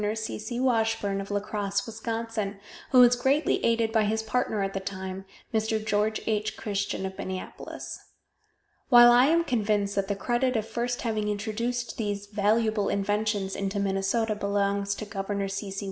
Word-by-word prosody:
C. 220 -1 -4
C. 235 +3 -4
Washburn 225 -5 +1
of 195 - -8
La 205 0 0
Crosse, 200 -1 -2
Wis., 225 -1 -8 0.9
who 255 - +5
was 245 0 +7
greatly 265 +5 +1
aided 230 -1 +2
by 220 -2 +3
his 220 +1 0
partner 220 -2 0
at 195 0 -2
the 195 - -1
time, 190 0 -6 0.3
Mr. 220 0 +1
George 215 +1 +1
H. 215 -1 -1
Christian 200 -2 -2
of 190 0 -5
Minneapolis. 185 0 -6 0.9
While 240 -2 +9
I 245 +2 +6
am 335 +2 +3
convinced 210 -7 0
that 195 -1 0
the 200 - -1
credit 240 +5 0
of 220 -1 -1
first 240 +2 -2
having 215 -3 -1
introduced 225 +3 -2
these 205 -2 -2
valuable 210 +1 +1
inventions 205 0 0
into 200 +1 -2
Minnesota 200 +3 0
belongs 200 -1 0
to 215 - -6
Gov. 200 -1 -3
C. 195 +1 -4
C. 195 +1 -5
210 Hz, 165 wpm, -27 LUFS, 200-225 Hz, 0.9 s, While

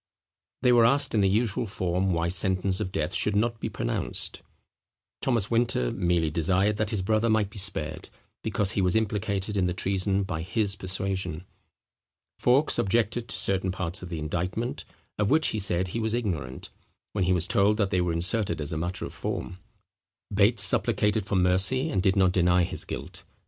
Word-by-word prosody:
They 125 - +5
were 120 -1 +5
asked 140 +3 +1
in 105 - +2
the 95 - +3
usual 110 +2 0
form 95 0 -1
why 85 0 0
sentence 95 +1 +1
of 100 -3 -3
death 75 -3 -2
should 105 - +2
not 115 +2 0
be - - -3
pronounced. - - -3 0.8
Thomas 115 -5 0
Winter 115 - +1
merely 85 -3 0
desired 95 +6 +1
that 105 -1 -1
his 105 -4 -2
brother 110 +3 +1
might 110 -2 +1
be 105 - -5
spared, 80 -6 -3 0.3
because 100 -2 0
he 100 - 0
was 90 -1 +2
implicated 105 -2 -1
in 95 -2 +1
the 90 - -2
treason 95 +1 0
by 80 -4 -4
his 100 +3 0
persuasion. 95 -3 -3 1.0
Fawkes 135 +5 +3
objected 115 +3 0
to - - -4
certain 95 -1 +1
parts 90 0 -4
of 90 - -8
the 85 - -4
indictment, 90 - -3 0.3
of 105 -1 +1
which 155 +1 +3
he 110 - -3
said 95 -2 +2
he 115 - -3
was 110 0 0
ignorant; 80 - -4 0.4
when 100 -3 -1
he 90 - +1
was 90 -1 +1
told 105 -1 +2
that 100 -3 0
they 90 - +1
were 90 -1 0
inserted 95 +4 0
as 75 +1 -4
a - - -2
matter 90 +3 -3
of - - -8
form. 90 - -5 0.7
Bates 100 +2 +5
supplicated 105 0 +3
for 100 - -1
mercy, 95 - +2
and 95 - 0
did 95 0 +2
not 95 -2 +3
deny 90 -1 +3
his - - -4
guilt. - - -7
95 Hz, 185 wpm, -26 LUFS, 90-110 Hz, 1.0 s, They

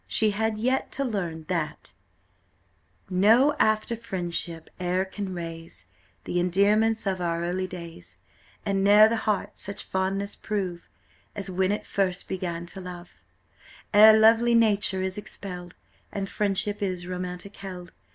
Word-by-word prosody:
She 215 -1 +3
had 220 +1 -1
yet 255 +4 0
to 275 - 0
learn 175 -9 -3
that 155 -2 -4 1.1
"No 220 +10 +4
after 215 +2 +2
friendship 175 -6 -4
e'er 180 +1 0
can 195 0 -5
raze 165 - -6 0.4
Th' - - -10
endearments 205 +5 +3
of 190 -2 -1
our 170 -1 -1
early 185 +2 -2
days, 165 - -9 0.5
And 195 -1 +1
ne'er 210 +2 +8
the 230 - 0
heart 215 -3 -2
such 200 +1 -4
fondness 195 +2 -1
prove, 185 -5 -4 0.5
As 195 -2 -3
when 190 +1 +1
it 210 - -2
first 190 -2 -1
began 175 -2 -4
to 195 - -8
love; 180 -1 -9 0.8
Ere 215 +1 +9
lovely 230 +2 +5
nature 205 -4 +3
is 190 +2 -3
expelled, 180 -4 -7 0.4
And 195 -1 -3
friendship 205 +1 0
is 185 -3 -2
romantic 180 +2 -6
held. 180 -3 -8
190 Hz, 140 wpm, -26 LUFS, 180-210 Hz, 1.1 s, Ere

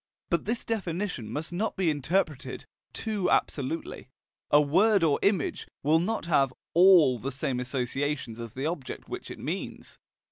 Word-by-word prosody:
But 170 - +1
this 230 +3 -1
definition 180 - -3
must 155 +6 -4
not 210 +6 -1
be 180 -4 +2
interpreted 150 -3 -1 0.3
too 210 -4 -2
absolutely: 140 0 -1 0.4
a 145 - +6
word 185 +7 +4
or 150 -3 +3
image 195 -7 0 0.2
will 155 +3 +4
not 215 +4 -1
have 140 -6 +3 0.2
ALL 170 -8 +6
the 135 +5 -4
same 130 -1 -2
associations 130 -1 -2
as 115 -2 -7
the 135 +2 -4
object 160 -4 -4
which - - -6
it - - -7
means. - - -6
155 Hz, 150 wpm, -28 LUFS, 135-185 Hz, 0.4 s, a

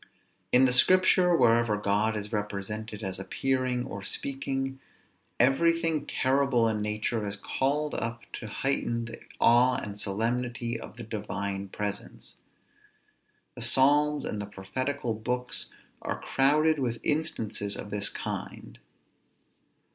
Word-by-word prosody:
In 125 +1 +6
the 125 - +2
Scripture, 180 +4 +5
wherever 115 -6 +3
God 105 +2 +1
is 105 +1 -6
represented 105 +1 -4
as 95 -1 -4
appearing 130 +4 -1
or 100 -6 -6
speaking, 135 +4 -3 0.6
everything 165 +3 +2
terrible 130 -3 +2
in 110 -1 0
nature 105 +2 -1
is 100 -1 -1
called 145 +7 -1
up 115 0 -2 0.2
to 110 - -7
heighten 115 0 -1
the 115 0 -8 0.2
awe 125 +2 +5
and 100 -1 -4
solemnity 115 +3 -2
of - - -10
the 120 - -7
Divine 100 -2 -4
presence. 105 +1 -5 1.2
The - - -10
Psalms, 145 +2 +3
and 105 - -3
the 105 - -5
prophetical 120 +6 -3
books, 125 +3 -2 0.3
are - - -3
crowded 150 +3 +2
with 120 -3 -1
instances 115 -10 -1
of 105 - -7
this 100 0 +4
kind. - - -6
120 Hz, 125 wpm, -28 LUFS, 105-135 Hz, 1.2 s, In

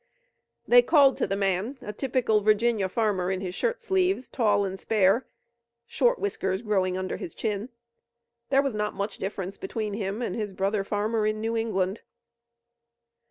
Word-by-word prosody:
They 245 0 +8
called 275 0 +5
to - - 0
the 195 - -1
man, 195 +6 -1
a 210 - -7
typical 240 -3 +1
Virginia 215 -1 +2
farmer 195 -4 0
in 190 -1 -1
his 185 -2 -5
shirt 480 - -2
sleeves, 380 - +1
tall 205 -5 +2
and 190 0 -5
spare, 210 +4 +2 0.6
short - - +2
whiskers 195 - -2
growing 190 -4 +1
under 185 0 -3
his 165 - -7
chin. 215 +1 -3 0.8
There 275 0 +4
was 275 -3 -1
not 210 0 -2
much 200 +1 -4
difference 195 -1 -4
between 225 - -4
him 205 +2 -3
and - - -2
his 210 -3 -3
brother 195 +2 0
farmer 210 +2 0
in 215 0 -1
New 225 +1 -2
England. 210 -3 -1
210 Hz, 160 wpm, -26 LUFS, 195-240 Hz, 0.8 s, They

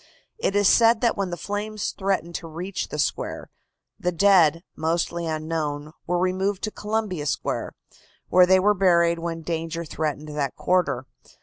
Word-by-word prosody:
It 200 - 0
is 205 -1 +4
said 230 +1 +5
that 235 - +2
when 195 -2 -2
the 175 - -4
flames 210 +2 -3
threatened 190 -3 -2
to 165 - -9
reach 175 +4 -4
the - - -6
square, 150 - -2 0.5
the 180 - 0
dead, 170 -3 +4
mostly 170 +1 -1
unknown, 155 -2 -3 0.2
were 175 +1 +1
removed 185 +2 0
to 215 - -1
Columbia 210 -9 -2
Square, 135 - -2 0.5
where 180 0 +6
they 190 0 +6
were 205 +3 +4
buried 170 -3 +3
when 165 -1 -4
danger 165 +1 -3
threatened 155 -1 -3
that 145 -3 -2
quarter. 180 -8 +1
175 Hz, 160 wpm, -24 LUFS, 160-195 Hz, 0.5 s, where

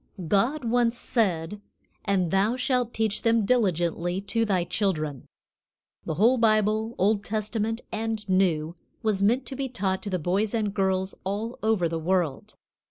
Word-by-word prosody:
GOD 240 - +1
once 240 0 +2
said: 200 -5 -1 0.4
"And 190 -5 +1
thou 200 +5 +2
shalt 250 -2 0
teach 220 -2 0
them 230 -2 +2
diligently 175 -5 +1
to 225 +3 0
thy 190 -4 +1
children." 165 - -2 0.8
The 160 - -2
whole 235 +8 +4
Bible, 215 0 +2
Old 205 +2 +2
Testament 220 +2 -2
and 220 -1 -3
New, 175 -4 +1 0.3
was 210 -3 +1
meant 235 +6 +2
to 265 - -6
be 270 0 -3
taught 190 -5 -1
to 205 - -4
the 185 - 0
boys 195 +7 0
and 210 -3 -1
girls 190 -1 0
all 210 +5 -3
over 215 -5 +2
the 165 0 -3
world. 170 -3 -1
205 Hz, 155 wpm, -26 LUFS, 185-225 Hz, 0.8 s, whole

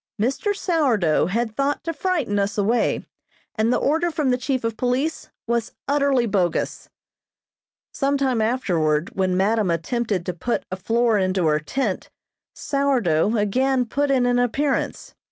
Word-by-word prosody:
Mr. 275 - 0
Sourdough 250 - +1
had 220 +3 -2
thought 280 +2 -1
to 330 - -3
frighten 295 - -1
us 200 +1 -1
away, 220 +4 +1 0.5
and 220 +2 +1
the - - +3
order 325 +5 +1
from 305 -5 0
the 250 - +2
chief 260 -1 -1
of 230 -1 -1
police 255 +7 -1 0.2
was 235 0 -1
utterly 280 -3 +2
bogus. 190 -5 -1 1.0
Some 280 +1 +1
time 260 -4 +1
afterward, 170 -10 0
when 185 -1 +1
madam 205 +1 +2
attempted 190 +2 -1
to 180 - -2
put 235 +8 -2
a - - -1
floor 225 +3 +1
into 185 -2 +1
her 150 -1 +3
tent, 210 - -3 0.5
"Sourdough" 235 - +1
again 255 +5 +1
put 285 +5 -1
in 260 -2 +3
an 245 0 +2
appearance. 265 +4 -1
235 Hz, 150 wpm, -22 LUFS, 195-275 Hz, 1.0 s, the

